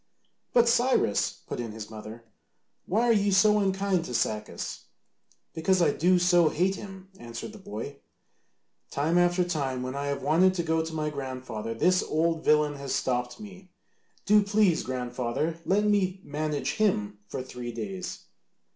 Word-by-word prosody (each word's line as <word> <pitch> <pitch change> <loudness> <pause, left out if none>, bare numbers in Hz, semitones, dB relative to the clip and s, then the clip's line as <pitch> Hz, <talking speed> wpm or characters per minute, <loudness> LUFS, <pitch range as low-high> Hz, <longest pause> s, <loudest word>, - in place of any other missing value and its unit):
"But, 240 -1 +4
Cyrus," 240 - +2
put - - -5
in 115 -3 -4
his 110 0 -8
mother, 110 +1 -9 0.6
"why 215 +6 +2
are 240 -1 +4
you 205 -1 +2
so 210 +2 +5
unkind 195 -2 +1
to 125 - -5
Sacas?" 105 -1 -3 0.7
"Because 185 +4 +2
I 165 -4 +4
do 180 +5 +3
so 175 -2 +4
hate 185 +5 +1
him," 195 -1 -9
answered 115 - -7
the 215 - -11
boy. 140 - -7 0.9
"Time 160 +5 +1
after 175 +1 +3
time 135 -7 -2
when 130 0 -4
I 140 +1 -3
have 140 - -3
wanted 185 +4 +4
to 170 - -1
go 160 0 +1
to 160 0 -6
my 150 -1 -1
grandfather 130 -5 -5
this 180 +10 +3
old 165 +1 0
villain 150 -1 +3
has 140 -1 -3
stopped 125 - -1
me. 190 -3 -11 0.6
Do 210 +1 +6
please, 200 -4 +2
grandfather, 125 +5 -3
let 200 +2 +3
me 195 -3 +1
manage 150 0 -2
him 105 - +1
for 130 - -5
three 125 -2 -7
days." 100 -5 -5
160 Hz, 160 wpm, -27 LUFS, 125-190 Hz, 0.9 s, Do